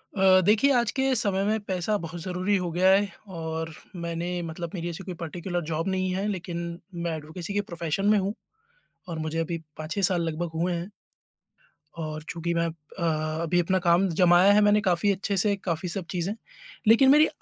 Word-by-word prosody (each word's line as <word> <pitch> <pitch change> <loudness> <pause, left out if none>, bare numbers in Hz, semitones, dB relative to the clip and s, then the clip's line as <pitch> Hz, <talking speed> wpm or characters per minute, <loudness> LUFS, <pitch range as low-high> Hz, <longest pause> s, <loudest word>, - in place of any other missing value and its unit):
अ, 190 -1 +6
देखिए 220 +7 +4
आज 235 -4 +2
के 265 0 +2
समय 200 -4 +1
में 220 +1 +1
पैसा 195 +1 -1
बहुत 165 +1 -6
ज़रूरी 185 +3 0
हो 180 -1 -2
गया 180 +3 +3
है 195 +1 +4 0.3
और 160 0 -4 0.2
मैंने 170 +1 -3
मतलब 165 0 -5
मेरी 175 -1 -3
ऐसी 170 +3 -6
कोई 185 - -6
पर्टिकुलर 175 +2 -4
जॉब 160 +3 -1
नहीं 185 -1 0
है, 195 +2 -1
लेकिन 170 -3 -4 0.2
मैं 170 -1 -2
एडवोकेसी 160 +5 -7
के 205 - +1
प्रोफ़ेशन 170 0 -3
में 210 - +5
हूँ 195 +1 0 0.8
और 165 -2 -4
मुझे 155 +1 -3
अभी 165 +1 -2 0.2
5-6 155 +5 -3
साल 180 -2 +3
लगभग 165 +1 -2
हुए 175 +3 0
हैं 175 +3 -4 1.1
और 155 0 -5
चूँकि 170 +1 -2
मैं 170 0 +1
अब 165 -1 -4 0.2
अ, - - -2 0.4
अभी 175 +2 +2
अपना 185 +2 +2
काम 175 +3 +5
जमाया 180 +3 +6
है 210 - +5
मैंने 210 0 +4
काफ़ी 190 0 +2
अच्छे 200 +1 -1
से 200 +1 +3
काफ़ी 170 0 -2
सब 185 +1 -4
चीज़ें, 180 +2 -1 0.5
लेकिन 230 +5 +7
मेरी 300 +2 +7
180 Hz, 195 wpm, -26 LUFS, 170-195 Hz, 1.1 s, लेकिन